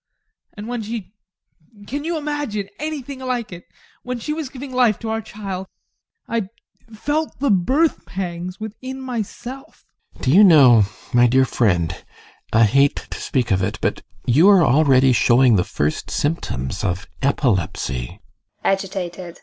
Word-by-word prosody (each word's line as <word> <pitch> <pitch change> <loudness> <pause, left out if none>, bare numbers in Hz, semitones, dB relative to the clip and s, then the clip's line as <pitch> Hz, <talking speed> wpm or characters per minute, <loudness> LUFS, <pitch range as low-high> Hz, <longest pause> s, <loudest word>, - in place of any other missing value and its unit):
And 210 +1 -7
when 240 -1 -3
she 215 -3 -6 0.7
can 285 +6 -4
you 335 0 -1
imagine 290 -10 -3
anything 285 -3 -5
like 250 -6 -3
it? 175 - -11 0.4
when 250 0 -4
she 300 +6 -3
was 310 -4 -4
giving 265 0 -8
life 245 -5 +3
to 225 - -6
our 225 0 -1
child 195 -3 -6 0.6
I 230 -4 -1 0.4
felt 295 +8 -2
the 280 -3 +2
birth 265 - +1
pangs 180 0 -5
within 255 +5 -7
myself. 250 +1 -7 0.3
GUSTAV. - - -15
Do 130 - +3
you 195 +7 +7
know, 130 - +7 0.3
my 120 0 +6
dear 130 +2 +4
friend 90 -10 +1 0.6
I 115 +1 +5
hate 140 +6 +4 0.2
to - - -6
speak 125 -4 -1
of 95 0 +2
it, 95 - -2
but - - -1 0.2
you 150 +11 +5
are 190 -5 +6
already 135 -2 +4
showing 120 0 +4
the 90 - +3
first 75 -6 -2
symptoms 95 - -2
of 95 0 -2 0.2
epilepsy. 95 - -1 0.4
ADOLPH. 185 -3 -2
190 Hz, 150 wpm, -21 LUFS, -, 0.7 s, you